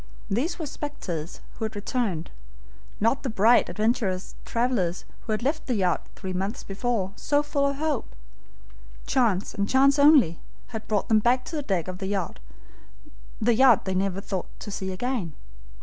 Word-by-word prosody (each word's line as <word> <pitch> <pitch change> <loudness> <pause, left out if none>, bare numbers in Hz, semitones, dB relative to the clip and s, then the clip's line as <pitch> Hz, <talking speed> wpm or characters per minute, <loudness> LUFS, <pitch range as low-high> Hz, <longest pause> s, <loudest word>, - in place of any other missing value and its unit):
These 255 - 0
were 325 - -4
specters 185 - -5 0.2
who 220 - -1
had 220 - -5
returned 205 - -2 0.7
not 230 +5 +2
the 265 - -2
bright, 225 +2 +4
adventurous 215 -4 0
travelers 230 -8 0 0.2
who 225 - -5
had 215 +2 -1
left 305 +4 -1
the 250 - +1
yacht 180 -4 0
three 190 -1 -5
months 195 +4 -3
before, 200 -1 -2
so 290 0 +1
full 285 -1 +1
of 280 - -1
hope! 295 -3 -2 0.9
Chance, 220 -7 +1
and 200 0 -1
chance 275 +2 +5
only, 285 - +6 0.3
had 220 -2 -6
brought 210 -2 0
them 220 -2 +5
back 245 +3 +2
to 330 - -6
the 300 - -1
deck 190 - -1
of 185 0 -5
the 190 - -3
yacht 200 -1 -2 1.0
they 235 -4 +4
never 195 0 0
thought 190 -2 -4
to 205 - -6
see 190 -1 -3
again. 195 - -2
220 Hz, 165 wpm, -26 LUFS, 190-260 Hz, 1.0 s, only